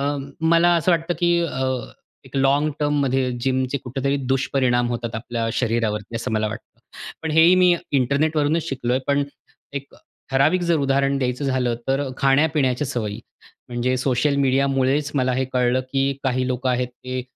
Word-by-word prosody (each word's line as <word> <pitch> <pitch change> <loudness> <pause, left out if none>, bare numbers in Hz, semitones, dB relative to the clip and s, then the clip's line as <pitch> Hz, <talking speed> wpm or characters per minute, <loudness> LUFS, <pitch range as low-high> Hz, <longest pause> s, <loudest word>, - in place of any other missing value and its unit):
अ, 145 +1 0 0.2
मला 170 +2 +4
असं 170 +2 +1
वाटतं 170 +1 0
की 175 0 +3
अ, 130 -6 -2 0.6
एक 130 +1 -9
लाँग 140 +3 +2
टर्ममध्ये 135 -3 +1
जिम 130 0 +1
चे 140 - 0
कुठेतरी 135 +2 -1 0.2
दुष्परिणाम 125 -2 +1
होतात 120 -1 -4
आपल्या 115 0 -3
शरीरावरती 115 -2 -1
असं 115 - -4
मला 110 0 0
वाटतं. 110 +2 -10 0.4
पण 160 - -2
हे 160 +1 +5
ही 180 +2 +7
मी 180 -1 +5 0.2
इंटरनेट 140 +4 +1
वरूनच 150 +2 +1
शिकलोय 125 -1 -1
पण 140 0 +2 0.5
एक 140 0 -6 0.4
ठराविक 145 +7 +3
जर 170 -1 +2
उदाहरण 140 0 +1
द्यायचं 125 +1 -2
झालं 130 -3 0
तर 135 +2 +1 0.2
खाण्यापिण्याच्या 140 -1 +2
सवयी. 110 -4 -3 0.5
म्हणजे 125 +1 -1
सोशल 130 +3 +1
मीडियामुळेच 135 +1 +1
मला 130 -2 +1
हे 130 - 0
कळलं 125 0 +2
की 135 0 +1
काही 130 -1 0
लोकं 130 0 -1
आहेत, 125 0 0
ते 125 +1 -6
135 Hz, 160 wpm, -22 LUFS, 125-145 Hz, 0.6 s, ही